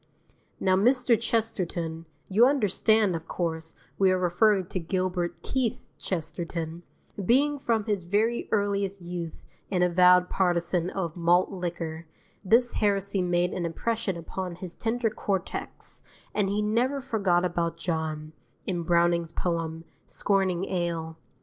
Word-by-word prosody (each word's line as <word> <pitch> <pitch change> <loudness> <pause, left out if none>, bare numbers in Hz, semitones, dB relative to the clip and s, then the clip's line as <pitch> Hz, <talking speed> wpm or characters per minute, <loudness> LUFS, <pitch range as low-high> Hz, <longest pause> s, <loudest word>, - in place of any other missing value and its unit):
Now 185 0 +3
Mr. 245 +4 +4
Chesterton 175 -8 -2 0.2
you 220 +6 +5
understand, 220 -6 +3
of 165 0 -6
course, 160 -2 -3 0.2
we 195 -1 +5
are 185 - +3
referring 185 +2 +3
to 185 - -2
Gilbert 180 0 -2
Keith 250 -3 -1 0.2
Chesterton 170 -1 -4 0.4
being 285 +8 +3
from 225 -5 0
his 205 -5 -1
very 215 +6 +1
earliest 200 -1 0
youth 175 -2 -5 0.3
an 180 -2 +2
avowed 180 0 +5
partisan 175 -1 +1
of 170 -5 -3
malt 175 +1 +3
liquor, 170 -3 -4 0.4
this 235 +5 +3
heresy 200 -2 +1
made 175 0 +1
an 180 - -2
impression 195 +3 -2
upon 180 +2 -5
his 180 0 -8
tender 230 0 0
cortex, 195 -4 -4 0.3
and 205 -2 +1
he 210 +1 0
never 240 +6 +1
forgot 195 -8 +1
about 170 -2 -1
John, 160 -2 -3 0.3
in 175 -3 -1
Browning's 170 -1 +2
poem, 165 -2 -2 0.2
scorning 190 -2 +1
ale. 170 -3 -2
185 Hz, 130 wpm, -27 LUFS, 170-210 Hz, 0.4 s, you